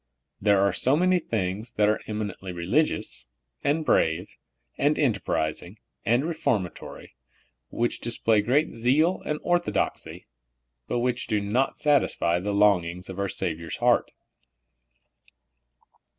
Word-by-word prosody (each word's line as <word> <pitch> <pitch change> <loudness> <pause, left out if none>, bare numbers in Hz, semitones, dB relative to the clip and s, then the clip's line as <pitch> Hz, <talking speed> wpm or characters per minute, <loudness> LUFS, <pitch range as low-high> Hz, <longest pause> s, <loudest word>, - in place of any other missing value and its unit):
There 100 -1 +4
are 100 - +2
so 135 +3 +2
many 180 +1 +3
things 110 - -3
that 105 -1 +2
are 105 - +1
eminently 105 -3 -4
religious, 90 - -1 0.4
and 155 +2 +1
brave, 85 - +2 0.5
and - - +1
enterprising, 85 +5 -1 0.3
and 120 +5 +2
reformatory, 120 - -3 0.6
which 120 +1 -1
display 115 -2 +1
great 135 +9 +1
zeal 140 +10 +2
and 150 - -1
orthodoxy, 175 0 -1 0.6
but 120 - -1
which 125 0 -1
do 110 -2 +1
not 110 +7 0
satisfy 140 - +2
the 100 +3 -3
longings 95 -3 +2
of 95 - -8
our 100 0 -1
Savior's 85 -1 -4
heart. 120 0 +2
110 Hz, 120 wpm, -26 LUFS, 95-130 Hz, 0.6 s, There